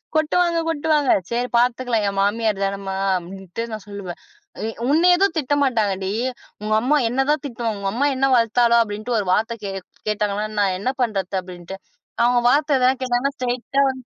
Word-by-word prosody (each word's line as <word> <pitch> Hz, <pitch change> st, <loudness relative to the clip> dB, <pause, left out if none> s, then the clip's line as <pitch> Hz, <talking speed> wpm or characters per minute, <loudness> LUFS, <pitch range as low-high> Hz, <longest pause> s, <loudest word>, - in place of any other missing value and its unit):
கொட்டுவாங்க, 335 Hz, +2 st, +2 dB
கொட்டுவாங்க. 305 Hz, -3 st, +1 dB, 0.2 s
சரி, 240 Hz, +1 st, -1 dB
பாத்துக்கலாம். 240 Hz, -2 st, +1 dB
என் 195 Hz, -, -6 dB
மாமியார் 210 Hz, 0 st, 0 dB
தானம்மா! 195 Hz, 0 st, -3 dB, 0.2 s
அப்பிடின்ட்டு 190 Hz, +4 st, -7 dB
நான் 215 Hz, -3 st, -6 dB
சொல்லுவேன். 200 Hz, -4 st, -7 dB, 0.4 s
அ -, -, -5 dB, 0.3 s
உன்ன 330 Hz, +5 st, +4 dB
ஏதும் 385 Hz, -1 st, +1 dB
திட்டமாட்டாங்கடி, 235 Hz, -10 st, 0 dB, 0.5 s
உங்கம்மா 220 Hz, +8 st, +2 dB
என்ன 265 Hz, +3 st, 0 dB
தான் 300 Hz, -1 st, 0 dB
திட்டுவாங்க. 230 Hz, -5 st, -3 dB
உங்கம்மா 220 Hz, +8 st, 0 dB
என்ன 265 Hz, +1 st, +1 dB
வளர்த்தாளோ! 235 Hz, 0 st, +3 dB
அப்பிடின்னு 215 Hz, +2 st, -2 dB
ஒரு 195 Hz, -, -3 dB
வார்த்த 225 Hz, +3 st, 0 dB
கே 195 Hz, -, -3 dB, 0.4 s
கேட்டாங்கன்னா, 210 Hz, 0 st, -1 dB
நான் 195 Hz, -2 st, +1 dB
என்ன 250 Hz, +7 st, 0 dB
பண்றது? 200 Hz, -5 st, -1 dB
அப்பிடின்ட்டு. 180 Hz, +1 st, -9 dB, 0.5 s
அவுங்க 245 Hz, 0 st, +3 dB
வார்த்த 290 Hz, 0 st, +3 dB
ஏதாவது 255 Hz, +1 st, +3 dB
கேட்டாங்கனா, 255 Hz, +2 st, 0 dB
ஸ்ட்ரெயிட்டா 250 Hz, +2 st, -1 dB
வந்து 260 Hz, -1 st, -6 dB
235 Hz, 150 wpm, -21 LUFS, 200-265 Hz, 0.5 s, உன்ன